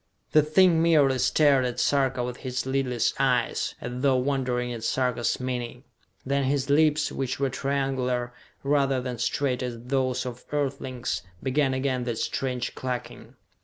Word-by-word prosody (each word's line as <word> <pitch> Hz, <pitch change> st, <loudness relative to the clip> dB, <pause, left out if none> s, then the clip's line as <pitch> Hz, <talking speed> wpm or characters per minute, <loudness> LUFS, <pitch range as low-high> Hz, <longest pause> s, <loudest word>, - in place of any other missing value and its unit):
The 155 Hz, -, +6 dB
thing 165 Hz, +2 st, +4 dB
merely 145 Hz, -6 st, +4 dB
stared 140 Hz, -1 st, +4 dB
at 125 Hz, -1 st, -2 dB
Sarka 135 Hz, -3 st, +1 dB
with 125 Hz, 0 st, -4 dB
his 130 Hz, -1 st, -3 dB
lidless 130 Hz, -3 st, 0 dB
eyes, 125 Hz, -3 st, +1 dB
as 125 Hz, +1 st, -5 dB
though 135 Hz, -1 st, +3 dB
wondering 125 Hz, -2 st, 0 dB
at 115 Hz, -2 st, -7 dB
Sarka's 125 Hz, -1 st, 0 dB
meaning. 125 Hz, -1 st, -4 dB, 0.4 s
Then 140 Hz, +1 st, +1 dB
his 140 Hz, +1 st, 0 dB
lips, 155 Hz, 0 st, +3 dB
which 130 Hz, -1 st, -3 dB
were 135 Hz, -1 st, 0 dB
triangular, 130 Hz, -3 st, -1 dB, 0.3 s
rather 140 Hz, -2 st, +2 dB
than 125 Hz, -2 st, -5 dB
straight 130 Hz, +2 st, 0 dB
as 120 Hz, -2 st, -4 dB
those 130 Hz, +1 st, -1 dB
of 125 Hz, 0 st, -7 dB
Earthlings, 135 Hz, -4 st, -2 dB, 0.2 s
began 135 Hz, 0 st, +1 dB
again 130 Hz, -2 st, -1 dB
that 120 Hz, -2 st, -2 dB
strange 125 Hz, 0 st, -2 dB
clucking. 125 Hz, -1 st, -6 dB
130 Hz, 150 wpm, -26 LUFS, 125-140 Hz, 0.4 s, The